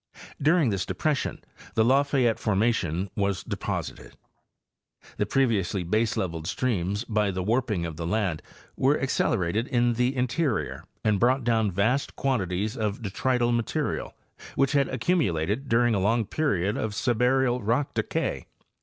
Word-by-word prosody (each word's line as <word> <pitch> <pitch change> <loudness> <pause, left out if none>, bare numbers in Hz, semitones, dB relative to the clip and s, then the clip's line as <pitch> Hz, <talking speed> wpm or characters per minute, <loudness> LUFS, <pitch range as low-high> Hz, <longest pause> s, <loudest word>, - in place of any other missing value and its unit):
During 155 -4 +3
this 95 -2 -1
depression 150 -3 -2 0.3
the 110 - +4
La 135 +3 +5
fayette 135 -5 +1
formation 100 -4 0
was 100 -2 -1
deposited. - - -5 1.0
The - - 0
previously 105 -8 +1
baseleveled 90 -5 -1
streams, 100 -2 -1
by 105 -3 0
the 95 -1 -2
warping 110 -4 0
of 80 -2 -6
the 85 -1 -3
land, 95 -5 0 0.3
were 140 +3 +2
accelerated 110 -4 0
in 120 -2 +2
the 125 +3 0
in 125 -1 +2
terior 130 0 -2 0.2
and 105 -2 +2
brought 130 +2 +3
down 110 -2 +2
vast 110 +9 0
quantities 105 -4 -1
of 105 -1 -2
detrital 120 +4 0
material 115 -2 -2 0.4
which 135 0 +2
had 140 -2 +2
accumulated 130 - 0
during 120 0 +3
a 100 - +1
long 110 +4 +2
period 105 - 0
of 110 -1 -2
subaerial 125 +2 +2
rock 120 +7 0
decay. - - -2
115 Hz, 140 wpm, -26 LUFS, 100-130 Hz, 1.0 s, La